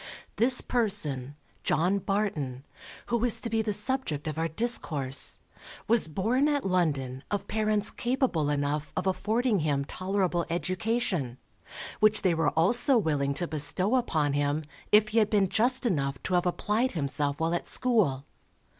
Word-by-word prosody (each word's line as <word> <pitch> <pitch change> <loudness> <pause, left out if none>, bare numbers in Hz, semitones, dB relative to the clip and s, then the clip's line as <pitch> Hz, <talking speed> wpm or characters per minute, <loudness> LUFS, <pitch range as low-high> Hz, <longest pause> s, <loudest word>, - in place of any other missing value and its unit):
This 245 +4 +6
person, 155 - -1 0.3
John 185 +5 +1
Barton, 155 -10 -3 0.4
who 235 -1 0
is 245 -3 +5
to 230 - -3
be 225 -1 +1
the 215 -1 -2
subject 210 - +2
of 155 - -3
our 165 - 0
discourse, 155 - +2 0.5
was 230 -6 +3
born 225 - 0
at 290 -5 -1
London, 145 -8 -1
of 205 - -3
parents 215 -1 0
capable 240 - -1
enough 145 +1 -2
of 185 - -2
affording 215 +3 0
him 145 -3 -1
tolerable 185 +1 -2
education, 185 - -2 0.6
which 215 -1 +3
they 185 -3 +2
were 165 -2 +1
also 240 - +3
willing 145 -8 -1
to 175 - -2
bestow 170 - +1
upon 155 - 0
him, 145 +2 -1 0.3
if 210 0 +4
he 225 +2 +2
had 215 - +2
been 200 -3 +2
just 250 +6 +1
enough 140 - -1
to 185 - -3
have 180 0 +1
applied 215 +7 -1
himself 140 -2 -2
while 165 +1 -1
at 175 - -3
school. 190 - +1
185 Hz, 155 wpm, -27 LUFS, 150-220 Hz, 0.6 s, This